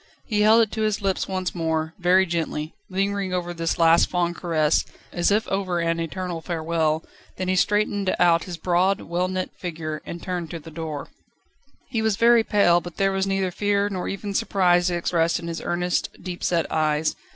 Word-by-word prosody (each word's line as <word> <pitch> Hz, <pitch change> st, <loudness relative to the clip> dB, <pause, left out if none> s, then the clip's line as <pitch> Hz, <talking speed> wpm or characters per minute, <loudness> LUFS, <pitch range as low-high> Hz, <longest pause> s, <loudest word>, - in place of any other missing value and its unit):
He 210 Hz, -2 st, 0 dB
held 220 Hz, +2 st, +6 dB
it 220 Hz, -, -3 dB
to 220 Hz, -, -3 dB
his 215 Hz, -1 st, +1 dB
lips 195 Hz, -2 st, -1 dB
once 185 Hz, -2 st, -2 dB
more, 160 Hz, -1 st, -1 dB
very 185 Hz, +2 st, +4 dB
gently, 165 Hz, -3 st, -3 dB, 0.2 s
lingering 195 Hz, 0 st, -1 dB
over 175 Hz, -1 st, -3 dB
this 165 Hz, -1 st, -2 dB
last 165 Hz, 0 st, +5 dB
fond 175 Hz, -1 st, 0 dB
caress, 160 Hz, -4 st, +1 dB, 0.3 s
as 175 Hz, -1 st, +2 dB
if 210 Hz, +2 st, +1 dB
over 190 Hz, -2 st, -1 dB
an 165 Hz, 0 st, 0 dB
eternal 170 Hz, 0 st, -4 dB
farewell, 160 Hz, -2 st, -1 dB, 0.3 s
then 185 Hz, -, -3 dB
he 185 Hz, -, +1 dB
straightened 205 Hz, 0 st, +1 dB
out 170 Hz, -1 st, +4 dB
his 175 Hz, -2 st, -6 dB
broad, 180 Hz, +3 st, +1 dB
well 175 Hz, +2 st, -1 dB
knit 185 Hz, 0 st, -3 dB
figure, 155 Hz, -3 st, -5 dB
and 170 Hz, -, -7 dB
turned 180 Hz, -3 st, -3 dB
to 170 Hz, -, -6 dB
the 160 Hz, +1 st, -12 dB
door. 155 Hz, -2 st, -5 dB, 0.8 s
He 230 Hz, -3 st, -2 dB
was 220 Hz, -2 st, +1 dB
very 235 Hz, +1 st, +5 dB
pale, 185 Hz, -6 st, +3 dB
but 175 Hz, 0 st, -10 dB
there 195 Hz, 0 st, +2 dB
was 195 Hz, 0 st, 0 dB
neither 195 Hz, -1 st, 0 dB
fear 205 Hz, +1 st, +1 dB
nor 185 Hz, -2 st, -3 dB
even 200 Hz, +1 st, -4 dB
surprise 180 Hz, -2 st, +2 dB
expressed 170 Hz, -1 st, +1 dB
in 170 Hz, -, -7 dB
his 165 Hz, 0 st, -4 dB
earnest, 175 Hz, +1 st, -1 dB
deep 180 Hz, -2 st, -7 dB
set 170 Hz, -2 st, +1 dB
eyes. 155 Hz, 0 st, +1 dB
180 Hz, 190 wpm, -24 LUFS, 165-195 Hz, 0.8 s, held